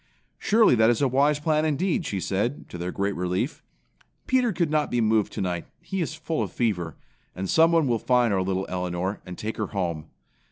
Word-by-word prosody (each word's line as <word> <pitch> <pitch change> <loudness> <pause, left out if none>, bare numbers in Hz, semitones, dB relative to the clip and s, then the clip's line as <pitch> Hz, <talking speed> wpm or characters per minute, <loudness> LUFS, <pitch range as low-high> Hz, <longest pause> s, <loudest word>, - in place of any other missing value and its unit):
"Surely 220 - +4
that 110 -1 +5
is 120 - +2
a 140 - +3
wise 140 +3 +2
plan 155 0 +1
indeed," 160 +2 0
she 100 - -2
said, 100 - -2
to 90 - -8
their 90 +1 -3
great 100 +1 -1
relief. 90 +1 -2 0.6
"Peter 250 -3 +2
could 170 -4 0
not 155 -1 +1
be 120 - 0
moved 110 -2 +2
tonight. 90 -3 -3
He 195 -1 -4
is 155 -1 -3
full 160 0 -3
of - - -3
fever. 90 -9 -1 0.4
And 95 +1 -3
someone 165 - +4
will 120 -3 +1
find 125 -3 +2
our 95 - +1
little 95 0 -1
Elinor, 90 +2 -3
and 90 - -7
take 110 +1 -4
her 110 - -2
home. 85 -6 -3
110 Hz, 200 wpm, -25 LUFS, 95-155 Hz, 0.6 s, that